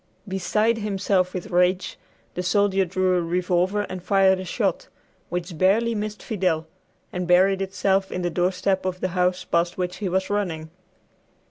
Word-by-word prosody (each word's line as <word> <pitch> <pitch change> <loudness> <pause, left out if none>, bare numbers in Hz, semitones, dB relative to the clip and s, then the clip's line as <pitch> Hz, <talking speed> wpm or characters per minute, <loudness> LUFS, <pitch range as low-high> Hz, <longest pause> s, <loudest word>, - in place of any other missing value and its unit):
Beside 210 +4 +1
himself 195 -3 0
with 185 +3 -6
rage, 180 +1 +2 0.4
the 180 - -3
soldier 195 +1 +2
drew 185 +1 +1
a - - +1
revolver 180 +3 0
and 185 -3 -6
fired 190 0 +3
a - - -4
shot, - - -1 0.4
which 175 -1 -4
barely 220 +5 +3
missed 210 0 -4
Fidel, 180 -6 0 0.5
and 180 -1 -3
buried 190 +2 +4
itself 195 0 0
in 180 - -3
the 175 - -1
doorstep 185 +2 0
of 185 -1 -3
the 185 - -1
house 180 0 0
past 170 +1 0
which 180 0 -3
he 200 -3 -2
was 190 +1 0
running. 165 -6 -2
185 Hz, 160 wpm, -24 LUFS, 180-195 Hz, 0.5 s, buried